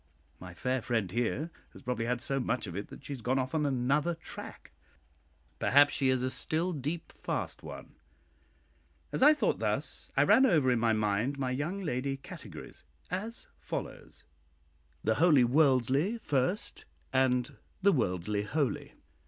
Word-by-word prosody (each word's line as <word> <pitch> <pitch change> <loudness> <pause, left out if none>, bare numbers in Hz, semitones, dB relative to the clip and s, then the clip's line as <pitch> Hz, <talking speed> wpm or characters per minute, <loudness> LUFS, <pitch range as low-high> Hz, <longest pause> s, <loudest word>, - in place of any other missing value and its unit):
My 90 -1 -10
fair 130 +6 -1
friend 110 -6 -1
here 120 - -1 0.2
has - - -13
probably 125 -2 -2
had 120 0 -1
so 135 0 0
much 125 -1 -1
of 90 -4 -7
it 100 - -4
that - - -12
she 145 - -4
has 130 - -7
gone 125 +4 +1
off 130 0 -1
on 150 -2 +1
another 140 +6 +1
tack; 160 - -8 0.9
perhaps 145 +1 +5
she 135 -2 +2
is 130 -1 +2
a 130 - 0
"still 170 +6 -1
deep 150 +3 -4
fast" - - -4
one. - - -9 1.2
As - - -2
I 300 +3 +8
thought - - +1
thus, - - -2
I - - +6
ran 265 0 +6
over 150 - +4
in 120 - +2
my 115 0 +3
mind 110 +5 0
my 130 -2 -1
young 165 +10 -2
lady 135 -3 -1
categories, 135 - -10 0.3
as 215 +6 -3
follows: - - -6 0.8
{The 110 - +3
wholly 155 -7 +6
worldly 135 - +3
First, 150 - -1
{ - - -37
and 125 -2 +2 0.3
{The 200 - +6
worldly 100 - 0
holy. 135 +6 -2
130 Hz, 160 wpm, -31 LUFS, 120-155 Hz, 1.2 s, I